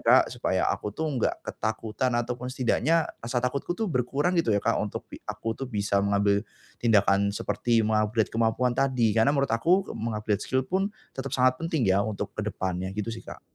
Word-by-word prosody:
Kak - - +5
supaya - - 0
aku - - -4
tuh 155 -2 -1
gak - - +1
ketakutan 110 +3 -2
ataupun 125 +1 -2
setidaknya 135 +5 +2 0.2
rasa 120 +2 -4
takutku 140 +7 -2
tuh 225 - -1
berkurang 145 - 0
gitu 120 - -4
ya 100 -2 +2
Kak - - +2
untuk - - -4 0.2
aku 115 - -2
tuh 135 +2 -6
bisa 100 -3 +1
mengambil 100 0 +2 0.4
tindakan 100 -3 +4
seperti 115 -1 +1
meng-upgrade 110 0 +1
kemampuan 115 +2 +1
tadi, 125 -5 +2
karena 110 +5 +5
menurut 140 -1 +1
aku 180 +12 +2
meng-upgrade 105 -2 -1
skill 130 0 +1
pun 190 +6 0 0.3
tetap 135 - -4
sangat 130 0 +4
penting 160 -6 0
ya 95 +1 +4
untuk 110 -2 -4
ke - - -1
depannya, 95 0 -2
gitu 105 +1 -2
sih 115 - -7
Kak. - - -9
115 Hz, 180 wpm, -27 LUFS, 105-135 Hz, 0.4 s, Kak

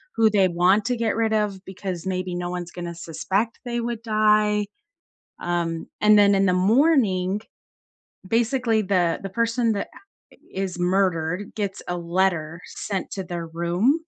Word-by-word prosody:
who 225 -1 +5
they 195 -3 +4
want 180 +4 +3
to 245 +1 0
get 230 -2 0
rid 225 -1 +1
of, 205 -3 -1
because 190 -2 -6
maybe 185 -1 -2
no 175 0 -3
one's 175 -1 -5
gonna 175 -1 -6
suspect 190 +7 -2
they 240 -1 -2
would 235 -1 -3
die, 215 -1 +3 0.8
um, 170 -1 -2
and 210 0 +6
then 200 0 +6
in 195 0 +3
the 185 - +3
morning, 205 - +3 0.9
basically, 230 0 +1
the 180 -4 +1
the 195 - -5
person 230 +2 +1
that 200 - -3 0.4
i - - -19 0.2
is 190 -2 -3
murdered 180 0 0
gets 200 -3 -3
a 175 - -1
letter 170 -2 0
sent 195 -3 -4
to 195 - -3
their 175 -1 -5
room. 175 - +1
195 Hz, 155 wpm, -24 LUFS, 175-220 Hz, 0.9 s, and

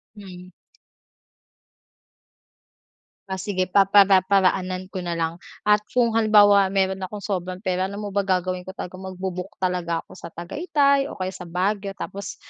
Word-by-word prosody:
Hmm. 185 -3 -12 2.8
Ah 190 0 -3
sige 185 0 -1
papara-paraanan 190 -1 +3
ko 185 - -4
na 175 -1 -3
lang. 165 +1 -2 0.2
At 210 0 +4 0.2
kung 235 -2 +3
halimbawa 205 -3 +5
meron 190 0 0
akong 205 +1 -8
sobrang 185 -1 -4
pera 185 -1 0
alam 200 +2 -7
mo 205 - -5
ba 200 - 0
gagawin 185 -1 -1
ko? 190 - -8
Talagang 185 +1 -7
magbu-book 185 +1 -6
talaga 170 -2 -1
ako - - -21
sa - - -8
Tagaytay, 280 - +1
o - - -8
kaya 185 0 -3
sa 180 -1 -9
Baguio. 195 +3 -2
Tapos 200 +1 -6
190 Hz, 145 wpm, -23 LUFS, 180-205 Hz, 2.8 s, halimbawa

